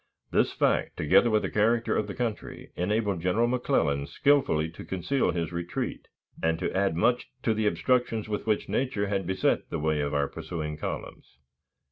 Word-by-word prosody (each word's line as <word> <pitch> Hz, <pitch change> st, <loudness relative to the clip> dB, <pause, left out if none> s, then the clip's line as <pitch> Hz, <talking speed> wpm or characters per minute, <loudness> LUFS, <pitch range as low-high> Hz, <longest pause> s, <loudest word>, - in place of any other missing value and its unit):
This -, -, +3 dB
fact, -, -, +1 dB
together 95 Hz, +9 st, +4 dB
with 110 Hz, -1 st, +2 dB
the -, -, -2 dB
character 115 Hz, +2 st, +2 dB
of 105 Hz, -, 0 dB
the 100 Hz, -, -6 dB
country, 115 Hz, -4 st, -4 dB
enabled 100 Hz, 0 st, 0 dB
General 90 Hz, +7 st, +2 dB
McClellan 100 Hz, -, +1 dB
skillfully 140 Hz, -, +2 dB
to 85 Hz, -, -10 dB
conceal 110 Hz, +9 st, 0 dB
his 85 Hz, 0 st, -2 dB
retreat, 85 Hz, 0 st, -4 dB, 0.3 s
and 80 Hz, 0 st, +1 dB
to 90 Hz, -, -3 dB
add 95 Hz, -3 st, +1 dB
much 120 Hz, +7 st, +1 dB
to 110 Hz, -, +2 dB
the 110 Hz, -1 st, 0 dB
obstructions 120 Hz, -2 st, +1 dB
with 105 Hz, 0 st, -4 dB
which 105 Hz, -1 st, +1 dB
nature 125 Hz, -6 st, 0 dB
had 95 Hz, -3 st, -1 dB
beset 95 Hz, 0 st, 0 dB
the -, -, -2 dB
way 75 Hz, -1 st, 0 dB
of 70 Hz, 0 st, -2 dB
our 70 Hz, -1 st, +2 dB
pursuing 75 Hz, 0 st, -5 dB
columns. 65 Hz, -3 st, -7 dB
100 Hz, 175 wpm, -27 LUFS, 80-115 Hz, 0.3 s, together